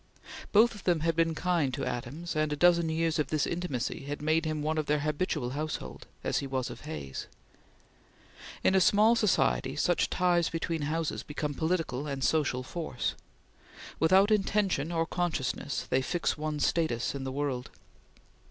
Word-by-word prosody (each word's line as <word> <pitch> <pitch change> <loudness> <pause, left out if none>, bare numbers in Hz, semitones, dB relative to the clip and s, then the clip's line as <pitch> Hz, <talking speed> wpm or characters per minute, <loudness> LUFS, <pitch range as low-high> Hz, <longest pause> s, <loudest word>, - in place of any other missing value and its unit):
Both 225 +3 +5
of 205 - -11
them 175 -4 +2
had 165 0 +1
been 165 0 +2
kind 170 -6 +1
to 135 -1 -3
Adams, 135 +8 -4
and 155 -1 +1
a - - 0
dozen 170 +1 +4
years 160 0 0
of 150 - +1
this 155 +1 0
intimacy 155 -7 -3
had 145 +1 -4
made 160 +2 +1
him 155 -1 -2
one 155 +1 0
of 155 - -2
their 150 0 +1
habitual 150 -4 -1
household, 145 - -5 0.2
as - - 0
he 140 - -4
was 130 -2 -2
of - - -10
Hay's. 70 - -6 1.4
In - - +4
a 190 - +5
small 210 +5 +5
society, 175 - +2
such 175 +3 +1
ties 175 -2 +2
between 165 -1 -2
houses 160 0 -1
become 150 0 -4
political 160 -4 -1
and 140 -2 -3
social 140 -4 +1
force. 140 -4 -3 0.9
Without 190 +6 +5
intention 195 -6 +1
or 165 -1 +1
consciousness, 155 -5 -2
they 130 - +2
fix 170 +6 -1
one's 155 -1 -1
status 125 -9 0
in 140 -1 -5
the 130 - -3
world. 135 -3 -2
155 Hz, 170 wpm, -29 LUFS, 140-170 Hz, 1.4 s, Both